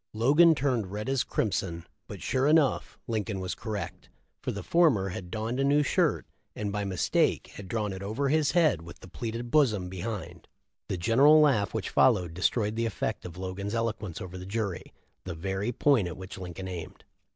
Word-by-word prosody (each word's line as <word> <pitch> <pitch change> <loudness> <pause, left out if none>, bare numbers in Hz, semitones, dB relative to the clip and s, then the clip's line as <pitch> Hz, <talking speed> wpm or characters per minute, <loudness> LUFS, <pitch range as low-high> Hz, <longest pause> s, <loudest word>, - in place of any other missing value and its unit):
Logan 150 +9 +5
turned 125 -9 0
red 105 +1 -4
as 135 -1 +1
crimson, 85 -5 -2 0.2
but - - -8
sure 130 +2 +1
enough, 155 -3 +2
Lincoln 110 -3 -2
was 95 -1 -3
correct, 105 -6 -6 0.3
for - - -2
the - - -6
former 140 - +3
had 90 0 -6
donned 110 +5 -3
a - - +2
new 145 +2 +4
shirt, - - +1 0.3
and 105 -1 -3
by 105 0 -2
mistake 95 -3 0
had 100 - -9
drawn 105 -1 -2
it 95 - -7
over 110 +8 -1
his 155 0 +2
head 160 - +3
with 85 +1 -12
the - - -11
pleated 115 +5 -5
bosom 110 -12 +3
behind. 90 -2 -6 0.4
The 95 - -2
general 135 - +6
laugh 130 -10 +3
which 110 -4 -3
followed 95 -10 +3
destroyed 105 +4 0
the 115 0 0
effect 105 - -3
of 90 -1 -8
Logan's 95 +3 -4
eloquence 110 -6 -2
over 95 0 -7
the 90 - -8
jury 100 -4 -3 0.2
— - - -45
the 90 -3 -5
very 95 +6 -2
point 125 -5 +3
at 85 - -6
which 95 +1 -8
Lincoln 90 +1 -6
aimed. 90 -3 -7
105 Hz, 190 wpm, -28 LUFS, 95-125 Hz, 0.4 s, general